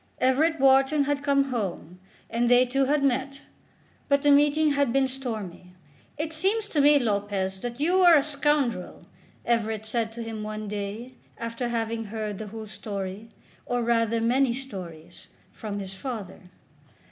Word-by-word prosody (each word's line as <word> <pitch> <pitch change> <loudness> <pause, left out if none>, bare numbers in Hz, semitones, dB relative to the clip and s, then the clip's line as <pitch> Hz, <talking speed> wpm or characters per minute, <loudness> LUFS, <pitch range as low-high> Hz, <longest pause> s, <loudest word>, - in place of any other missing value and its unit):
Everett 295 +5 +2
Wharton 270 +2 +4
had 285 0 -1
come 275 -1 +1
home, 185 -6 -4 0.3
and 235 +1 0
they 245 +1 +6
two 270 +2 +1
had 285 +1 +1
met; 275 +1 0 0.7
but 280 0 +3
the 290 - +5
meeting 295 +2 +4
had 280 -3 +1
been 270 +1 +2
stormy. 215 -9 -6 0.4
"It 310 +1 -3
seems 400 +7 0
to 295 - +2
me, 290 +1 +6
Lopez, 200 -5 -1
that 240 +4 -6
you 355 +5 +2
are 345 -3 +8
a 280 - +2
scoundrel," 285 -8 -1 0.4
Everett 220 -2 0
said 225 0 -1
to 235 0 -6
him 225 -1 -6
one 215 0 -5
day 210 +5 -5 0.2
after 230 +1 -4
having 225 -1 -2
heard 215 -1 -5
the 215 - -6
whole 220 +1 -8
story, 200 0 -6 0.4
or 245 -1 0
rather 230 -1 +1
many 245 +2 +2
stories, 185 -9 -8 0.2
from 210 -2 -6
his 195 -1 -4
father. 210 -3 -6
235 Hz, 160 wpm, -26 LUFS, 215-275 Hz, 0.7 s, are